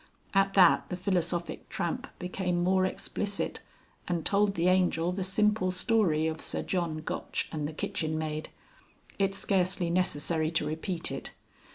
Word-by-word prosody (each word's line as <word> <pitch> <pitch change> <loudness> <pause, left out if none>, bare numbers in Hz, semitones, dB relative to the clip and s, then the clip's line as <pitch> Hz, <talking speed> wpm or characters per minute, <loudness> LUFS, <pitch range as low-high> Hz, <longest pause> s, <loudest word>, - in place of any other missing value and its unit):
At 195 0 +3
that 180 -3 +6
the 180 - -3
Philosophic 175 -2 -1
Tramp 170 - -2
became 180 -1 -1
more 185 +1 +3
explicit, 200 +1 -2 0.5
and 175 -2 -1
told 200 0 +3
the 170 0 +2
Angel 180 -2 +3
the 190 +1 -2
simple 210 0 +2
story 185 -5 +2
of 160 0 -2
Sir - - -3
John 170 -4 -1
Gotch - - -2
and 150 -2 -2
the - - -5
kitchen 155 +1 -2
maid. 155 0 -3 0.7
It's 195 0 +2
scarcely 185 -2 +1
necessary 160 -3 +1
to 160 -2 0
repeat 165 +3 -2
it. - - -5
180 Hz, 150 wpm, -29 LUFS, 160-190 Hz, 0.7 s, that